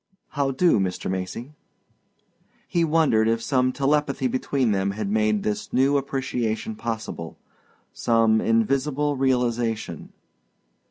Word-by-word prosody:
"How 140 Hz, -1 st, -1 dB
do, 135 Hz, -, +3 dB
Mr. 95 Hz, -1 st, -2 dB
Macy?" 95 Hz, +8 st, -5 dB, 1.2 s
He 170 Hz, -, +1 dB
wondered 155 Hz, -9 st, +3 dB
if 115 Hz, 0 st, +2 dB
some 130 Hz, +1 st, +1 dB
telepathy 140 Hz, 0 st, 0 dB
between 130 Hz, -1 st, 0 dB
them 95 Hz, -1 st, 0 dB
had 105 Hz, -2 st, -2 dB
made 105 Hz, -1 st, +1 dB
this 105 Hz, -1 st, -3 dB
new 135 Hz, +3 st, +3 dB
appreciation 130 Hz, -, -2 dB
possible 110 Hz, -, -5 dB, 0.6 s
some 115 Hz, -1 st, +2 dB
invisible 135 Hz, +6 st, +1 dB
realization. 120 Hz, -, -1 dB
125 Hz, 110 wpm, -24 LUFS, 110-140 Hz, 1.2 s, do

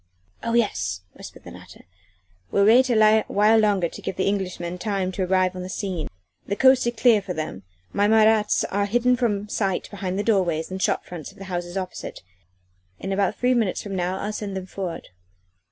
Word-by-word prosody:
"Oh 230 Hz, 0 st, -2 dB
yes!" 150 Hz, -, 0 dB
whispered -, -, -12 dB
the -, -, -10 dB
latter, -, -, -14 dB, 0.7 s
"we'll 200 Hz, -, +3 dB
wait 250 Hz, +4 st, +6 dB
awhile 215 Hz, -1 st, +4 dB
longer 205 Hz, -5 st, +2 dB
to -, -, -10 dB
give -, -, -4 dB
the 190 Hz, -, 0 dB
Englishmen 180 Hz, -3 st, -2 dB
time 195 Hz, -3 st, -1 dB
to 190 Hz, -, -4 dB
arrive 185 Hz, 0 st, +1 dB
on 185 Hz, -, -5 dB
the 180 Hz, -, -6 dB
scene. 185 Hz, -6 st, -3 dB, 0.4 s
The 200 Hz, -, -1 dB
coast 260 Hz, +1 st, +5 dB
is 240 Hz, -, -1 dB
clear 225 Hz, -2 st, +5 dB
for 185 Hz, -2 st, -5 dB
them 155 Hz, -11 st, -5 dB, 0.3 s
my 205 Hz, +1 st, +2 dB
Marats 220 Hz, -1 st, +4 dB
are 200 Hz, +1 st, 0 dB
hidden 245 Hz, +4 st, +2 dB
from 210 Hz, -5 st, -1 dB
sight 195 Hz, -3 st, -2 dB
behind 190 Hz, -2 st, -4 dB
the 205 Hz, -, 0 dB
doorways 180 Hz, -7 st, +1 dB
and 190 Hz, 0 st, -4 dB
shop -, -, 0 dB
fronts 170 Hz, -4 st, -8 dB
of -, -, -21 dB
the 195 Hz, -, -9 dB
houses 175 Hz, +1 st, -3 dB
opposite. 185 Hz, -, -6 dB, 0.8 s
In 195 Hz, -, -4 dB
about 195 Hz, -1 st, +1 dB
three 250 Hz, +1 st, +2 dB
minutes 225 Hz, -6 st, 0 dB
from 200 Hz, -2 st, -5 dB
now 180 Hz, +1 st, -1 dB
I'll 210 Hz, +2 st, -4 dB
send 200 Hz, -2 st, -4 dB
them 185 Hz, -, -5 dB
forward." 185 Hz, -3 st, -6 dB
200 Hz, 195 wpm, -24 LUFS, 185-215 Hz, 0.8 s, wait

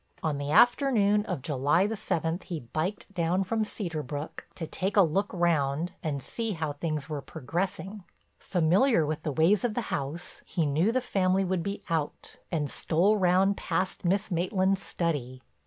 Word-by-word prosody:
On 150 Hz, -3 st, 0 dB
the 145 Hz, 0 st, -3 dB
afternoon 215 Hz, -, +4 dB
of 130 Hz, -, -3 dB
July 145 Hz, +6 st, +2 dB
the 220 Hz, +2 st, -1 dB
seventh 175 Hz, -4 st, -2 dB
he 170 Hz, -4 st, -4 dB
biked 160 Hz, -, -3 dB
down 175 Hz, +1 st, +1 dB
from 220 Hz, +3 st, 0 dB
Cedar 175 Hz, -7 st, -4 dB
Brook 145 Hz, +2 st, -6 dB
to 165 Hz, -, -4 dB
take 190 Hz, +5 st, -2 dB
a 200 Hz, -, +8 dB
look 190 Hz, +5 st, 0 dB
round 165 Hz, -2 st, +1 dB
and 140 Hz, -5 st, -3 dB
see 225 Hz, -2 st, -3 dB
how 160 Hz, -4 st, -2 dB
things 150 Hz, -1 st, -3 dB
were 150 Hz, -3 st, -4 dB
progressing. 180 Hz, +8 st, -4 dB, 0.4 s
Familiar 180 Hz, -, +3 dB
with 155 Hz, +1 st, -3 dB
the 155 Hz, -, -2 dB
ways 170 Hz, +8 st, +3 dB
of 235 Hz, -3 st, 0 dB
the -, -, +1 dB
house, 145 Hz, +5 st, -4 dB
he 165 Hz, -, -1 dB
knew 155 Hz, +9 st, +2 dB
the 255 Hz, +2 st, +1 dB
family 190 Hz, -4 st, +1 dB
would 185 Hz, -1 st, 0 dB
be 200 Hz, +4 st, -4 dB
out 160 Hz, -4 st, -3 dB
and 155 Hz, -4 st, 0 dB
stole 175 Hz, +9 st, +2 dB
round 190 Hz, +1 st, +3 dB
past 185 Hz, +2 st, -2 dB
Miss 195 Hz, +3 st, +1 dB
Maitland's 190 Hz, +2 st, +1 dB
study. 135 Hz, -10 st, -3 dB
175 Hz, 170 wpm, -28 LUFS, 155-195 Hz, 0.4 s, a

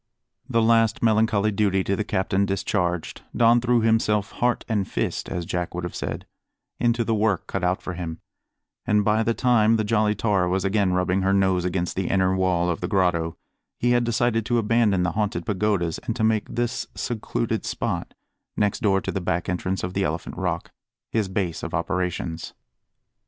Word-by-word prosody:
The 115 Hz, -3 st, +2 dB
last 115 Hz, -1 st, +3 dB
melancholy 110 Hz, -1 st, +3 dB
duty 95 Hz, -2 st, +1 dB
to 100 Hz, -, 0 dB
the 105 Hz, -, -1 dB
captain 100 Hz, -1 st, 0 dB
discharged, 90 Hz, -3 st, -1 dB
Don 120 Hz, 0 st, +5 dB
threw 120 Hz, -1 st, +2 dB
himself 110 Hz, -2 st, +2 dB
heart 120 Hz, 0 st, 0 dB
and 105 Hz, -4 st, 0 dB
fist -, -, -2 dB
as 85 Hz, -1 st, -3 dB
Jack 90 Hz, 0 st, -3 dB
would 90 Hz, -, -3 dB
have 90 Hz, -, -4 dB
said -, -, -4 dB, 0.5 s
into 120 Hz, 0 st, +2 dB
the 115 Hz, -, 0 dB
work 105 Hz, -4 st, +1 dB
cut 95 Hz, -, -4 dB
out 90 Hz, +1 st, 0 dB
for 90 Hz, -, -4 dB
him; 85 Hz, -2 st, -5 dB, 0.7 s
and 105 Hz, -1 st, +3 dB
by 110 Hz, +1 st, +3 dB
the 115 Hz, +1 st, +1 dB
time 115 Hz, -3 st, +3 dB
the 110 Hz, -, +1 dB
Jolly 105 Hz, 0 st, +2 dB
Tar 100 Hz, -5 st, +1 dB
was 95 Hz, +1 st, 0 dB
again 100 Hz, -2 st, +2 dB
rubbing 90 Hz, +1 st, +1 dB
her 95 Hz, +1 st, +2 dB
nose 95 Hz, -2 st, +2 dB
against 90 Hz, -1 st, -1 dB
the 95 Hz, -1 st, -1 dB
inner 95 Hz, -1 st, +2 dB
wall 90 Hz, -2 st, +1 dB
of 85 Hz, -2 st, -2 dB
the 90 Hz, -, -1 dB
grotto, 90 Hz, -4 st, +1 dB, 0.4 s
he 120 Hz, -, +1 dB
had 120 Hz, 0 st, +3 dB
decided 120 Hz, -1 st, +1 dB
to 120 Hz, -, +2 dB
abandon 110 Hz, -4 st, +2 dB
the 90 Hz, -, 0 dB
Haunted 105 Hz, +1 st, -2 dB
Pagodas 100 Hz, -5 st, 0 dB
and 115 Hz, -, -4 dB
to 115 Hz, -, -2 dB
make 110 Hz, -1 st, +1 dB
this 120 Hz, 0 st, -2 dB
secluded 110 Hz, -, -2 dB
spot -, -, -3 dB, 0.4 s
next 105 Hz, -1 st, +1 dB
door 100 Hz, -5 st, +2 dB
to -, -, -3 dB
the 95 Hz, -, -3 dB
back 85 Hz, 0 st, -1 dB
entrance 90 Hz, +1 st, -2 dB
of 90 Hz, -, -3 dB
the 100 Hz, -, 0 dB
Elephant 80 Hz, -1 st, -3 dB
Rock -, -, -3 dB, 0.4 s
his 110 Hz, -3 st, 0 dB
base 95 Hz, -3 st, -2 dB
of -, -, -4 dB
operations. 90 Hz, 0 st, -3 dB
100 Hz, 190 wpm, -24 LUFS, 90-110 Hz, 0.7 s, Don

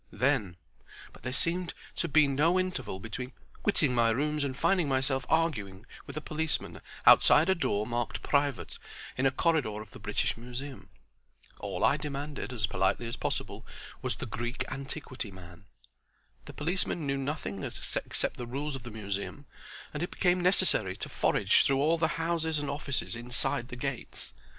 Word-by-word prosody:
Then—but 90 Hz, -, -3 dB
there 125 Hz, -, -3 dB
seemed 170 Hz, +6 st, +1 dB, 0.2 s
to 170 Hz, -, +1 dB
be 155 Hz, -1 st, +5 dB
no 155 Hz, +7 st, +3 dB
interval 130 Hz, -, -2 dB
between 125 Hz, +5 st, -5 dB, 0.3 s
quitting 155 Hz, -10 st, +3 dB
my 115 Hz, -1 st, +4 dB
rooms 150 Hz, +5 st, +1 dB
and 135 Hz, -2 st, -2 dB
finding 175 Hz, 0 st, +2 dB
myself 135 Hz, -1 st, +1 dB
arguing 110 Hz, -, 0 dB, 0.2 s
with 140 Hz, -, -7 dB
a -, -, -2 dB
policeman 155 Hz, +1 st, -2 dB, 0.2 s
outside 160 Hz, +5 st, +7 dB
a -, -, +6 dB
door 105 Hz, -, 0 dB
marked 120 Hz, +1 st, -2 dB
Private 140 Hz, -3 st, 0 dB, 0.4 s
in 130 Hz, +2 st, +3 dB
a -, -, +3 dB
corridor 135 Hz, -8 st, +1 dB
of 110 Hz, -, -10 dB
the -, -, -11 dB
British -, -, 0 dB
Museum. 125 Hz, +4 st, -7 dB, 0.7 s
All -, -, -3 dB
I -, -, +5 dB
demanded, 145 Hz, -2 st, -4 dB
as 115 Hz, -4 st, 0 dB
politely 95 Hz, +4 st, +1 dB
as 115 Hz, -, -3 dB
possible, -, -, -3 dB, 0.4 s
was -, -, -1 dB
"the -, -, -5 dB
Greek 120 Hz, +3 st, -3 dB
antiquity 135 Hz, -3 st, -5 dB
man." 90 Hz, -1 st, -13 dB, 0.8 s
The -, -, -9 dB
policeman 170 Hz, 0 st, -1 dB
knew 140 Hz, 0 st, 0 dB
nothing 135 Hz, -8 st, -3 dB
except -, -, -2 dB
the 120 Hz, -, -5 dB
rules 140 Hz, +4 st, -3 dB
of 135 Hz, -, -5 dB
the 120 Hz, -, -8 dB
Museum, 105 Hz, +5 st, -4 dB, 0.5 s
and 150 Hz, -, -3 dB
it 175 Hz, -, -1 dB
became 180 Hz, -1 st, +2 dB
necessary 180 Hz, -, +4 dB
to -, -, -5 dB
forage -, -, +3 dB
through 135 Hz, -, +3 dB
all 160 Hz, +4 st, +3 dB
the 160 Hz, -, +3 dB
houses 165 Hz, -1 st, 0 dB
and 145 Hz, -1 st, -1 dB
offices 140 Hz, -4 st, -1 dB
inside 120 Hz, 0 st, 0 dB
the 125 Hz, -, -7 dB
gates. 130 Hz, 0 st, -3 dB
135 Hz, 165 wpm, -30 LUFS, 120-155 Hz, 0.8 s, outside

